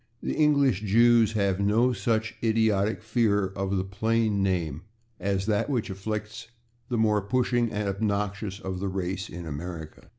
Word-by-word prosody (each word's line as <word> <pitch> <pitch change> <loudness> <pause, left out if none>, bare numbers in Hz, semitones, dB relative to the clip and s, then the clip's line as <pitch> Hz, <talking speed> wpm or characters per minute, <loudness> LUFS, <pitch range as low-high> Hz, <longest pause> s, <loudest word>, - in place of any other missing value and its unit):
The - - -1
English 140 -8 +3
Jews 115 +1 +4
have 100 -3 +1
no 110 +5 +3
such 110 +1 -1
idiotic 110 -2 +1
fear 110 -3 +1
of 95 0 -2
the 95 - 0
plain 110 +1 0
name 85 -6 -1 0.4
as 95 0 -1
that 105 +5 0
which 120 -6 -1
afflicts 110 +4 -5 0.4
the 120 - 0
more 105 -2 +3
pushing 120 +2 +1
and 105 -1 -2
obnoxious 100 0 -2
of 95 -1 -5
the 100 - -2
race 95 0 -3
in 85 0 -7
America. 80 +1 -7
105 Hz, 155 wpm, -27 LUFS, 95-110 Hz, 0.4 s, Jews